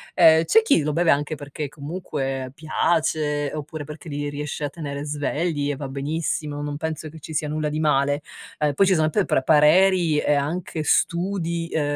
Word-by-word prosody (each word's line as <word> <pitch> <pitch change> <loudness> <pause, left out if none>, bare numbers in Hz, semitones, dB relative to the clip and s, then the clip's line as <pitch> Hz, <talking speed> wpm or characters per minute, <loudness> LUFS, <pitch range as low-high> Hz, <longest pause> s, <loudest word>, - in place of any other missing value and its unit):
Ehm, 160 -2 +6
c'è 450 - +4
chi 305 - +3
lo 150 - -1
beve 170 0 +3
anche 145 +2 0
perché, 145 +1 -6
comunque, 140 -4 -4
piace 155 -1 0
oppure 155 0 -6
perché 150 +2 -10
li 145 0 -3
riesce 150 +1 -5
a 145 - -1
tenere 145 -2 -6
svegli 145 +1 -1
e 145 - -1
va 140 0 -6
benissimo, 150 +2 -3
non 145 0 -4
penso 155 0 -4
che 160 - -12
ci 160 +2 -9
sia 150 0 0
nulla 155 0 -2
di 150 +1 -3
male. 145 -1 +2 0.4
Ehm, 150 -1 +1
poi 195 - +4
ci 190 - +4
sono 155 -1 +2
p 205 +5 +2
pr 135 - +1
pareri, 160 +2 +4
e 150 - +2
anche 155 +3 -2
studi, 170 0 0
uhm 160 - +2
150 Hz, 190 wpm, -23 LUFS, 145-165 Hz, 0.4 s, Ehm